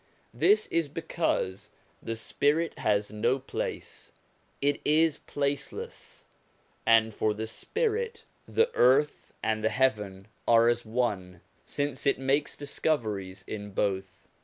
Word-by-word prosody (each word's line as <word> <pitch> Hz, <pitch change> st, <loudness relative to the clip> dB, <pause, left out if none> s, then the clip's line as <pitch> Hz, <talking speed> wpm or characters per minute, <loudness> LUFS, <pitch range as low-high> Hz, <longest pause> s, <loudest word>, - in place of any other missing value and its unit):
This 415 Hz, +2 st, +4 dB
is 165 Hz, -3 st, +1 dB
because 160 Hz, -, -2 dB, 0.3 s
the 115 Hz, -, -3 dB
spirit 145 Hz, +8 st, 0 dB
has 105 Hz, -1 st, +1 dB
no 115 Hz, +5 st, +1 dB
place, 135 Hz, -, -5 dB, 0.5 s
it 145 Hz, 0 st, +1 dB
is 155 Hz, +1 st, +3 dB
placeless; 140 Hz, 0 st, -4 dB, 0.6 s
and 110 Hz, -1 st, +5 dB
for 105 Hz, 0 st, 0 dB
the 110 Hz, +1 st, -3 dB
spirit, 455 Hz, -, -2 dB, 0.2 s
the 460 Hz, +1 st, +2 dB
earth 140 Hz, +4 st, +3 dB
and 110 Hz, -1 st, 0 dB
the 110 Hz, -, +3 dB
heaven 105 Hz, -5 st, 0 dB, 0.2 s
are 115 Hz, 0 st, +6 dB
as 120 Hz, 0 st, 0 dB
one, 105 Hz, -7 st, -2 dB, 0.2 s
since 145 Hz, -2 st, -2 dB
it 140 Hz, -, +3 dB
makes 135 Hz, +3 st, 0 dB
discoveries 105 Hz, -10 st, -2 dB
in 105 Hz, -1 st, -6 dB
both. 95 Hz, -1 st, -2 dB
120 Hz, 120 wpm, -28 LUFS, 105-145 Hz, 0.6 s, are